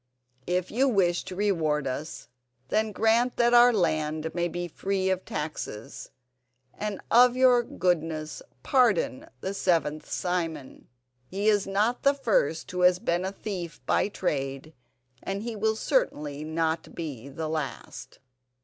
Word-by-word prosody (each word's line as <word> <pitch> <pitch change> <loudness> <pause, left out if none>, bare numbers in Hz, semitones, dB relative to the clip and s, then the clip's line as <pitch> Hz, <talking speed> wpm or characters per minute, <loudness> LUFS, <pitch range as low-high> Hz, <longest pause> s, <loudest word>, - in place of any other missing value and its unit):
If 180 0 -1
you 265 +4 +2
wish 180 -6 +2
to 185 - -7
reward 165 -8 0
us 140 +4 -5 0.4
then 215 0 +1
grant 225 +4 +2
that 240 0 +3
our 240 +1 +8
land 155 -5 0
may 175 0 0
be 175 +1 -4
free 190 +2 -1
of 185 0 -2
taxes, 150 -8 -6 0.6
and 210 -2 -4
of 245 +1 +6
your 255 -1 +5
goodness 165 -7 -2 0.2
pardon 220 - +2
the 190 - -3
seventh 165 -6 0
Simon. 165 -6 -3 0.4
He 200 +6 -2
is 205 -2 +2
not 210 +5 +1
the 280 0 +4
first 195 - 0
who 180 0 -2
has 180 0 +5
been 175 0 -1
a 190 - -2
thief 185 -5 -6
by - - +2
trade 140 -6 -3 0.5
and 195 +2 -4
he 230 -1 -4
will 220 +1 +1
certainly 150 - -1
not 160 +1 -2
be 140 -6 -6
the 155 +3 -5
last." 155 -4 -5
180 Hz, 140 wpm, -27 LUFS, 155-215 Hz, 0.6 s, our